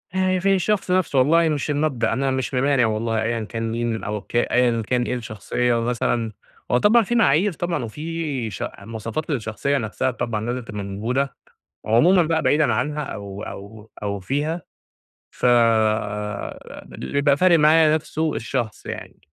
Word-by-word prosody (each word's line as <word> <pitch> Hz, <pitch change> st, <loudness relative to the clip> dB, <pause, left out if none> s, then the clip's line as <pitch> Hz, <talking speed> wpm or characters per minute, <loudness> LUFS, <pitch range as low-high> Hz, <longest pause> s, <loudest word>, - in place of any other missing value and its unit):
آآ 185 Hz, 0 st, +2 dB
في 195 Hz, +1 st, +3 dB
الشخص 190 Hz, +1 st, 0 dB
نفسه 180 Hz, -7 st, +2 dB
والله 160 Hz, +5 st, +4 dB
مش 150 Hz, 0 st, -2 dB
المبدأ، 145 Hz, -6 st, 0 dB
أنا 135 Hz, +2 st, 0 dB
مش 130 Hz, 0 st, -2 dB
ممانع 135 Hz, -1 st, +3 dB
والله 110 Hz, +1 st, -1 dB
أيًا 115 Hz, -1 st, -1 dB
كان 115 Hz, +1 st, -4 dB
مين 115 Hz, -1 st, -2 dB
أو 105 Hz, 0 st, -3 dB
ك -, -, -12 dB
أيًا 120 Hz, -1 st, +2 dB
كان 125 Hz, -1 st, +1 dB
إيه 125 Hz, -, -2 dB
الشخصية، 120 Hz, +1 st, -1 dB
مثلًا 115 Hz, -1 st, -1 dB, 0.4 s
هو 125 Hz, -, +4 dB
طبعًا 220 Hz, -, +5 dB
في 240 Hz, +4 st, -2 dB
معايير 195 Hz, -2 st, +3 dB
طبعًا، 170 Hz, -4 st, -2 dB
وفي 150 Hz, -1 st, -4 dB
ش 95 Hz, -, -5 dB, 0.2 s
مواصفات 115 Hz, +8 st, -5 dB
للشخصية 135 Hz, +1 st, -1 dB
نفسها 120 Hz, +2 st, -1 dB
طبعًا 110 Hz, -3 st, -3 dB
لازم 125 Hz, +1 st, -2 dB
تبقى 105 Hz, -3 st, -6 dB
موجودة. 115 Hz, +8 st, -2 dB, 0.5 s
عمومًا 165 Hz, -, +5 dB
بقى 160 Hz, 0 st, 0 dB
بعيدًا 150 Hz, -4 st, +3 dB
عنها 150 Hz, +6 st, -1 dB
أو 100 Hz, -6 st, -7 dB
أو 105 Hz, +2 st, -9 dB
أو 100 Hz, -1 st, -2 dB
فيها 145 Hz, -, -2 dB, 0.7 s
ف -, -, -4 dB
آآ 110 Hz, -3 st, 0 dB
اللي 65 Hz, -, -7 dB
بيبقى 140 Hz, 0 st, +3 dB
فارق 175 Hz, -1 st, +5 dB
معايا 155 Hz, 0 st, +5 dB
نفسُه 155 Hz, 0 st, -2 dB
الشخص، 115 Hz, -1 st, -3 dB
يعني -, -, -7 dB
125 Hz, 160 wpm, -22 LUFS, 110-155 Hz, 0.7 s, طبعًا